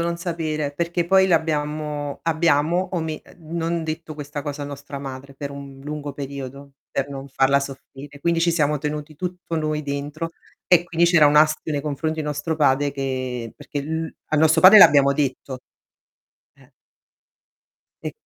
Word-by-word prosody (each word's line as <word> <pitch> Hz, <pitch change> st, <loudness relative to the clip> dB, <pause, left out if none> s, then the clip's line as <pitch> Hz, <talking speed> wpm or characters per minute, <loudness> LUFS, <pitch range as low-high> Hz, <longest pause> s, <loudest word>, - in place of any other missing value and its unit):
non 170 Hz, 0 st, -1 dB
sapere, 160 Hz, -4 st, -3 dB
perché 170 Hz, +3 st, -1 dB
poi 190 Hz, +2 st, +5 dB
l'abbiamo 150 Hz, -3 st, -1 dB
abbiamo 165 Hz, +2 st, +2 dB
ome 160 Hz, -3 st, -3 dB, 0.2 s
uhm, 165 Hz, 0 st, -7 dB
non 165 Hz, 0 st, -1 dB
detto 160 Hz, 0 st, -5 dB
questa 145 Hz, 0 st, -6 dB
cosa 145 Hz, 0 st, -5 dB
a -, -, -3 dB
nostra 140 Hz, 0 st, -7 dB
madre 135 Hz, 0 st, -8 dB
per 140 Hz, +1 st, -6 dB
un 140 Hz, -1 st, -10 dB
lungo 150 Hz, 0 st, -5 dB
periodo, 140 Hz, 0 st, -7 dB, 0.2 s
per 140 Hz, 0 st, -2 dB
non 140 Hz, 0 st, -7 dB
farla 135 Hz, +1 st, +3 dB
soffrire. 140 Hz, +1 st, -9 dB
Quindi, 170 Hz, +1 st, +1 dB
ci 170 Hz, +1 st, +3 dB
siamo 150 Hz, -3 st, +1 dB
tenuti 150 Hz, +1 st, -4 dB
tutto 180 Hz, +1 st, -5 dB
noi 155 Hz, -1 st, -1 dB
dentro, 145 Hz, +3 st, -4 dB, 0.4 s
e 175 Hz, -2 st, +5 dB
quindi 170 Hz, 0 st, +1 dB
c'era 170 Hz, -3 st, +6 dB
un 145 Hz, -, +3 dB
astio 155 Hz, +1 st, +3 dB
nei 145 Hz, -1 st, -1 dB
confronti 155 Hz, +2 st, -2 dB
di -, -, -3 dB
nostro 150 Hz, +2 st, -2 dB
padre 145 Hz, -1 st, +3 dB
che 130 Hz, -4 st, -4 dB
perché 145 Hz, -, -6 dB
l 160 Hz, +2 st, -3 dB, 0.2 s
a -, -, +3 dB
nostro 160 Hz, +1 st, +4 dB
padre 195 Hz, +4 st, +10 dB
l'abbiamo 140 Hz, -7 st, +7 dB
detto. 135 Hz, -2 st, -2 dB, 0.9 s
Eh. 135 Hz, -2 st, -23 dB, 1.3 s
E -, -, -3 dB
150 Hz, 165 wpm, -22 LUFS, 140-165 Hz, 1.3 s, padre